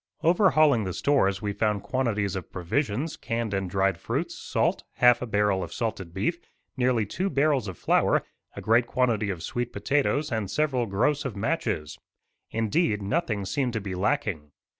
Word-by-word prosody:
Overhauling 155 - +4
the 95 -2 -3
stores 100 -5 +1
we 100 -1 -1
found 105 -1 0
quantities 105 -7 -1
of 95 - -6
provisions, 120 - -1
canned 115 -2 -3
and 95 -2 -1
dried 95 -1 +1
fruits, - - -2
salt, - - -1
half 125 -1 +5
a 125 - -3
barrel 105 -3 +1
of 85 - -7
salted 100 -7 -3
beef, 110 - -1 0.4
nearly 125 -4 +2
two 185 - -2
barrels 140 - +2
of 95 -4 -6
flour, - - +2 0.3
a - - -6
great 115 +2 +3
quantity 115 -6 +1
of 90 -4 -4
sweet 120 +4 -3
potatoes 145 +6 0
and 110 -4 -2
several 130 -1 0
gross 125 +9 +1
of 130 -6 -4
matches. 105 - -2 0.5
Indeed, 110 - 0
nothing 105 - -1
seemed 125 +6 -1
to 110 - -1
be 100 -2 -5
lacking. 95 - -1
110 Hz, 165 wpm, -26 LUFS, 100-135 Hz, 0.5 s, half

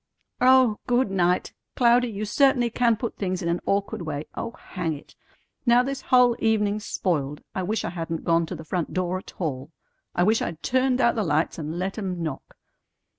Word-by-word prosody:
"Oh, 255 -4 +5
good 245 -3 +2
night! 180 -1 +1 0.2
Cloudy, 245 0 +4
you 215 -2 -4
certainly 250 +1 +3
can 235 -1 +3
put 235 +1 -4
things 185 -2 -2
in 170 - -1
an 170 +1 0
awkward 200 -2 0
way. 155 -2 -4
Oh, - - -4
hang 175 -8 -4
it! 145 - -14 0.5
Now 240 0 +5
this 275 +1 -4
whole 250 -2 +4
evening's 215 -1 +1
spoiled. 150 -5 -1
I 190 - -2
wish 210 +5 -1
I - - -3
hadn't 165 -1 -4
gone 165 0 +2
to - - -5
the 160 - -9
front 175 0 -2
door 185 0 0
at - - -14
all. 140 -6 -3 0.5
I 175 - +3
wish 220 +4 +3
I'd 165 -1 -4
turned 260 0 +2
out 235 - +4
the 220 - -1
lights 160 0 0
and 155 +2 -4
let 190 +4 -3
'em 180 -4 -3
knock. 150 -4 -6
195 Hz, 195 wpm, -25 LUFS, 170-235 Hz, 0.5 s, Oh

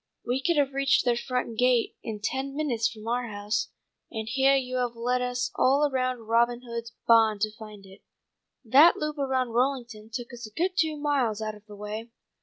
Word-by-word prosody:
We 250 +3 0
could 340 +2 +1
have 280 -2 +2
reached 275 -1 +2
their 240 -1 +3
front 245 -2 -3
gate 250 -2 +2
in 215 -2 -6
ten 270 +4 -2
minutes 245 -7 0
from 220 -1 -11
our 240 +1 -1
house, 205 0 -2 0.4
and 220 -1 -5
heah 270 +3 +3
you 255 -1 -2
have 245 -1 -1
led 250 +2 0
us 250 0 -2
all 280 +3 +3
around 255 -3 -2
Robin 235 +2 +2
Hood's 235 -1 -6
bahn 225 -2 +5
to 215 +1 -1
find 215 -2 -12
it. 190 0 -15 0.6
That 285 +9 +7
loop 300 -1 -3
around 260 -2 0
Rollington 240 -3 -1
took 245 +1 -6
us 235 -2 -7
a 215 - -17
good 360 - 0
two 315 -4 +1
miles 275 -7 0
out 215 0 -3
of 210 0 -16
the 210 - -11
way." 210 +3 -6
245 Hz, 200 wpm, -27 LUFS, 220-265 Hz, 0.6 s, That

